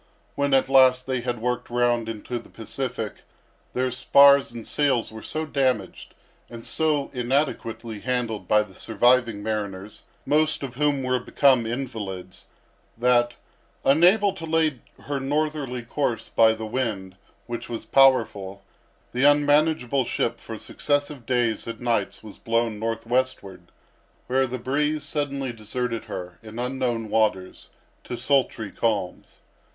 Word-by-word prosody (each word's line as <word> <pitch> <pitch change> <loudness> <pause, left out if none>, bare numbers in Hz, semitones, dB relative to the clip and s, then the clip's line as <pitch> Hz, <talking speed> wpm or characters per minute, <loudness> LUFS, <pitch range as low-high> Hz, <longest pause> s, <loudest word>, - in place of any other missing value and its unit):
When 140 -1 +1
at 135 - +3
last 130 -1 +5
they 130 -2 -1
had 120 -1 -3
worked 125 +2 -2
round 120 -1 +1
into 115 +2 -5
the - - -16
Pacific, 115 -1 -5 0.6
their 130 0 0
spars 140 +2 +6
and 115 -1 -8
sails 135 -7 +1
were 110 0 -9
so 155 +6 -3
damaged, 130 -9 -1 0.3
and 115 -1 -10
so 155 -3 0
inadequately 120 -4 -2
handled 115 -5 -2
by 105 +2 +4
the 100 -3 -16
surviving 120 0 +2
mariners, 105 -2 -4 0.2
most 155 0 +1
of 130 -3 -5
whom 145 0 0
were 130 0 +1
become 130 -2 +3
invalids, 105 -7 -6 0.5
that, 120 0 +2 0.5
unable 185 +8 +5
to 170 -4 -7
lay 160 -4 +1 0.2
her 140 -1 -3
northerly 145 -3 -2
course 120 -1 -2
by 110 -1 +5
the 110 0 -6
wind, 110 -6 -3 0.3
which 120 0 -6
was 115 -1 -5
powerful, 100 -8 +3 0.5
the 125 +2 -1
unmanageable 145 -2 +3
ship, 115 0 -1
for 110 - -8
successive 145 0 -2
days 120 -4 0
and 115 -1 -6
nights, 120 -2 -1
was 105 -2 -12
blown 115 -2 0
northwestward, 115 -5 -2 0.5
where 130 +1 +1
the 130 +1 -4
breeze 150 +4 -1
suddenly 140 -3 -3
deserted 115 +1 -4
her, 90 -1 -7
in 110 0 -11
unknown 125 -2 -2
waters, 95 - -1 0.3
to 120 - -6
sultry 125 -7 0
calms. 100 -6 -3
125 Hz, 135 wpm, -24 LUFS, 110-135 Hz, 0.6 s, spars